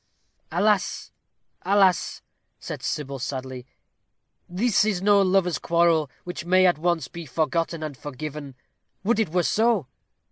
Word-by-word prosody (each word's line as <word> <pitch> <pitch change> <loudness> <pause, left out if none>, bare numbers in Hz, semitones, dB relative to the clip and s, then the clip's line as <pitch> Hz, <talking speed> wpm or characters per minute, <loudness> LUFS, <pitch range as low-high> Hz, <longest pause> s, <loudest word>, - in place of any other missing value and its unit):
"Alas! 200 +3 0 0.5
alas!" 190 -1 +2 0.4
said - - -7
Sybil, 140 -2 -4
sadly, 130 -1 -5 0.8
"this 205 +6 +2
is 210 -4 0
no 200 +1 +4
lover's 185 -2 +2
quarrel, 170 -3 +2
which 175 -1 -6
may, 185 +2 +4
at 175 -4 +3
once, 170 -4 0
be 170 +2 -9
forgotten 160 +3 -1
and 150 -3 -5
forgiven 145 0 -7 0.5
would 220 +2 +1
it 220 -6 +1
were 175 +2 +1
so!" 220 - +2
170 Hz, 130 wpm, -24 LUFS, 150-195 Hz, 0.8 s, no